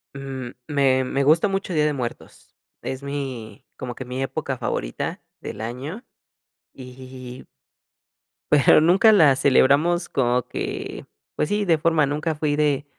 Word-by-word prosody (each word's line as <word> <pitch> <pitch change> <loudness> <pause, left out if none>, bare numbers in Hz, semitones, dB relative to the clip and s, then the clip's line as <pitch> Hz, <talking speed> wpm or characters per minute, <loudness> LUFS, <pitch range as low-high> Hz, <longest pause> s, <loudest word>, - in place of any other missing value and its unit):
M 130 -3 -6
me 135 -3 +2
me 135 +2 -1
gusta 160 +7 +4
mucho 195 -1 -3
Día 150 -2 +2
de 150 - +1
Muertos. 125 -4 -7 0.3
Es 130 +1 -5
mi 130 -7 -6
como 125 -1 -5
que 130 - -7
mi 125 +2 -4
época 135 -1 -3
favorita - - -3 0.2
del 105 - -7
año 135 - -6 0.7
y 130 0 -10 1.1
pero 150 +1 +6
nunca 190 +7 +5
la 155 -10 +6
celebramos 145 +6 +3
como 125 -2 +1
que - - -5 0.3
pues 150 - -1
sí 205 0 0
de 165 -3 +3
forma, 155 -1 +2
nunca 150 +3 -2
fui 150 -1 0
de 145 -1 +1
140 Hz, 145 wpm, -23 LUFS, 130-155 Hz, 1.1 s, pero